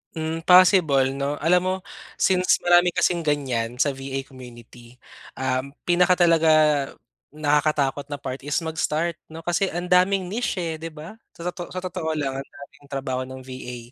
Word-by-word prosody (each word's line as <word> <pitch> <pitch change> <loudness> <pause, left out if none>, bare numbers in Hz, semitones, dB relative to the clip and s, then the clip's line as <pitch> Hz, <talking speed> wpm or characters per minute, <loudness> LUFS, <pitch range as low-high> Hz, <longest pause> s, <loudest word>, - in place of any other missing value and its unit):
Hmm, 160 0 -3
possible 180 -6 +6
'no? 140 +1 -2
Alam 175 +2 +4
mo 185 - +1 0.4
since 185 -1 +2
marami 175 0 +4
kasing 175 - +2
ganyan 125 -5 -1
sa 140 +3 +1
VA 135 0 -5
community, 120 -2 -14 0.4
um, 130 +1 -2
pinaka 180 +1 +3
talaga 165 -1 +4 0.9
nakakatakot 145 -2 +1
na 145 - -4
part 135 -1 -6
is 145 +2 -4
mag-start 160 +1 -2
'no, 160 +1 -10
kasi 175 +3 0
ang 175 +1 -5
daming 185 +1 +4
niche, 230 +2 -2
eh, 160 -1 -4
'di 165 - -5
ba? 165 +9 -10 0.2
So, 170 - -10
toto 175 -1 -8
sa 185 - -4
totoo 175 -4 -3
lang 135 -3 -2
ang 135 - -8
daming 140 0 -14
trabaho 135 -2 -3
ng 130 0 -9
VA. 130 -1 -8
150 Hz, 165 wpm, -23 LUFS, 135-175 Hz, 0.9 s, possible